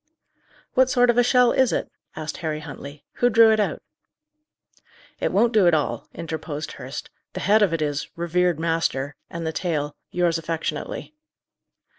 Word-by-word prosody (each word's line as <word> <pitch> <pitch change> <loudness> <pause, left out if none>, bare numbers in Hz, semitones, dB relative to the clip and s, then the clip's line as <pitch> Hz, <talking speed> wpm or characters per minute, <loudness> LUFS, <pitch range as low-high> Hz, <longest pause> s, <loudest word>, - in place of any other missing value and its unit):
"What 260 0 +4
sort 245 -1 +4
of 240 - +1
a - - +6
shell 250 0 +4
is 260 -2 +3
it?" - - -2 0.2
asked 155 0 -5
Harry 155 -3 -3
Huntley. 145 -1 -9
"Who 245 - +4
drew 225 -1 +6
it 220 - +2
out?" 210 - -1 1.4
"It - - 0
won't 230 +4 +3
do 205 -5 +5
at 170 - +5
all," 150 - -2
interposed 160 -2 -5
Hurst. - - -8 0.2
"The - - -4
head 210 +3 +4
of 200 -4 +4
it 165 -2 0
is, 145 -1 -2
'Revered 175 0 +1
master,' 160 -4 -1
and 170 -1 -5
the 160 - -2
tail, 150 -5 -2
'Yours 175 -2 +1
affectionately. 165 - -4
170 Hz, 165 wpm, -24 LUFS, 155-220 Hz, 1.4 s, a